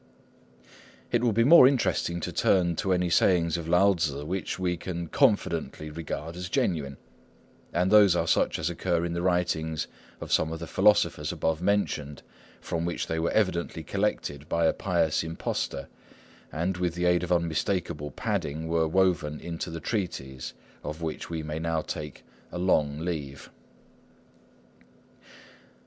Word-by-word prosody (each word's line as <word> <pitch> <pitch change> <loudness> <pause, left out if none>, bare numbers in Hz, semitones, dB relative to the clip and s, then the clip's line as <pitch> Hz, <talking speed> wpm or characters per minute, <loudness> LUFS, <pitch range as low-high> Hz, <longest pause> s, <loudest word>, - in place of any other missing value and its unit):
It 120 0 +2
will 120 - +3
be 115 +2 +3
more 140 0 +9
interesting 95 -9 +1
to - - -3
turn 85 -3 +2
to 95 - 0
any 90 -1 +1
sayings 85 -2 +3
of 85 -2 -4
Lao 95 +4 +5
Tzŭ 75 -5 -2
which 95 +4 -3
we 90 -1 0
can 85 0 -5
confidently 90 - 0
regard 80 +1 -5
as 90 +1 -5
genuine; 70 -8 -1 0.7
and 90 +3 +1
those 105 -4 +7
are 85 - +1
such - - +2
as - - -2
occur 85 -2 0
in 85 - -3
the 85 - -2
writings 85 -4 0 0.3
of - - -7
some 80 - +2
of 80 - -4
the 85 - -5
philosophers 95 -6 +2
above 80 0 -1
mentioned, 90 -7 -1 0.4
from 85 0 -3
which 85 0 -2
they 80 - -2
were 80 - 0
evidently 85 -5 0
collected 75 -1 -2
by 85 0 +2
a - - +4
pious 85 -5 0
impostor, 80 -4 -3 0.6
and, 90 +4 -1
with 90 -2 -1
the 90 0 -1
aid 90 0 +3
of 90 0 -4
unmistakable 85 -2 0
padding, 75 +3 -3
were 80 -1 +1
woven 85 -4 +1
into 85 0 -5
the 85 0 -5
treatise, 70 - -4 0.3
of 75 +3 -6
which 80 -1 -4
we 80 -2 -3
may 75 +1 -4
now 80 0 0
take 75 -2 -6 0.3
a 90 - -5
long 75 -5 +2
leave. 75 -6 -5
85 Hz, 155 wpm, -27 LUFS, 80-90 Hz, 0.7 s, more